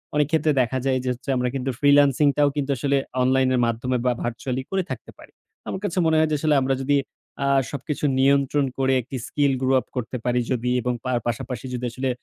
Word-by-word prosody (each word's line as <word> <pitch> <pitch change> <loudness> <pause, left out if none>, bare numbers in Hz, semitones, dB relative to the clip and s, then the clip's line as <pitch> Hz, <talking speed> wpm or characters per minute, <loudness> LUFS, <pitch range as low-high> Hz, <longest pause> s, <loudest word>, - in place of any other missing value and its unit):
অনেক 150 -1 +3
ক্ষেত্রে 160 -1 +2
দেখা 125 +1 -1
যায় 130 -1 +2
যে - - -5
হচ্ছে 135 +3 -11
আমরা 125 - 0
কিন্তু 135 0 -2
ফ্রিল্যান্সিংটাও 145 0 +4
কিন্তু 145 -1 -1
আসলে 140 +3 +1 0.3
অনলাইনের 130 -1 +2
মাধ্যমে 120 +2 -1
বা 125 - +4
ভার্চুয়ালি 125 +2 -3
করে 190 -1 0
থাকতে 120 -5 -7
পারি। - - -16 0.4
আমার 190 - -4
কাছে 185 -2 -3
মনে 160 -1 +3
হয় 155 0 +2
যে, - - +2
আসলে 155 0 +2
আমরা 135 +1 +1
যদি 145 +1 +2 0.5
আ - - +1 0.2
সবকিছু 145 +2 -3
নিয়ন্ত্রণ 140 +1 +3
করে 135 0 +2
একটি 130 +3 -7
স্কিল 140 -2 +1
গ্রো 130 0 +2
আপ - - -11
করতে 125 +1 -3
পারি 125 0 +2 0.4
এবং 125 +2 -1
তার 125 -2 0
পাশাপাশি 125 +1 -4
যদি 125 0 -3
আসলে 130 +2 -2
135 Hz, 200 wpm, -23 LUFS, 125-145 Hz, 0.5 s, ফ্রিল্যান্সিংটাও